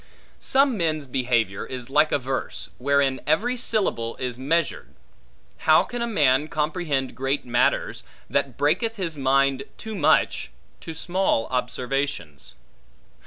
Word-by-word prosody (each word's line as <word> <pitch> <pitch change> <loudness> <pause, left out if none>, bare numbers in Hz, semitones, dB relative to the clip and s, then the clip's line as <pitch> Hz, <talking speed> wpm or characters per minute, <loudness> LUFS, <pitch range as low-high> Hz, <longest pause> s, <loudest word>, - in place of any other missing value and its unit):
Some 270 -3 +2
men's 155 -4 0
behavior 120 -6 0
is 125 -2 -6
like 150 +2 +4
a - - +3
verse, 130 0 -4
wherein 135 0 +2
every 220 +12 +2
syllable 200 - 0
is 125 -1 -4
measured; 160 +3 -1 0.7
how 155 - +7
can 245 -1 -5
a 235 - 0
man 150 - +3
comprehend 150 -3 -1
great 135 +3 -2
matters, 120 0 +1 0.2
that - - -1
breaketh 225 - +1
his 175 -6 -3
mind 135 0 +2 0.2
too 220 - -7
much, 175 -8 +2 0.3
to 160 - -8
small 175 -8 0
observations? 125 - -3
140 Hz, 125 wpm, -24 LUFS, 130-170 Hz, 0.7 s, how